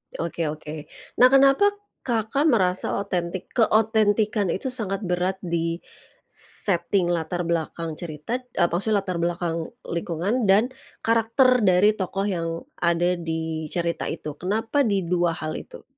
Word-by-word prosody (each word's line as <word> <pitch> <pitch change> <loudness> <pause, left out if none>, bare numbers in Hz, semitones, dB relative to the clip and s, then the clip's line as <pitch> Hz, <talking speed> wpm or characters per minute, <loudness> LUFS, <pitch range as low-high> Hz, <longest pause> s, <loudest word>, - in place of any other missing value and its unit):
Oke 165 -1 -2
oke. 150 0 -6 0.3
Nah, 250 - +9
kenapa, 275 +7 +5 0.4
Kakak, 235 +6 +1
merasa 185 -9 +2
otentik 180 -1 -4
keotentikan 215 -2 +2
itu 195 +9 -2
sangat 205 -4 -3
berat 180 +1 0
di 170 -1 -2 0.5
setting 175 -1 +2
latar 175 +1 -2
belakang 165 -1 -3
cerita 170 +9 -4
eee, 250 -8 0
maksudnya 200 +3 +1
latar 185 -3 -3
belakang 170 -1 -1 0.2
lingkungan, 175 +7 -1
dan 210 +6 +4 0.3
karakter 230 +3 +3
dari 185 +3 +5
tokoh 195 +1 -2
yang 180 -5 -1 0.3
ada 175 +1 +1
di 160 -1 -3
cerita 170 +1 -2
itu? 150 -1 -6
Kenapa 225 +8 0
di 175 -4 +1
hal 155 -2 -4
itu? - - -12
180 Hz, 130 wpm, -24 LUFS, 170-220 Hz, 0.5 s, Nah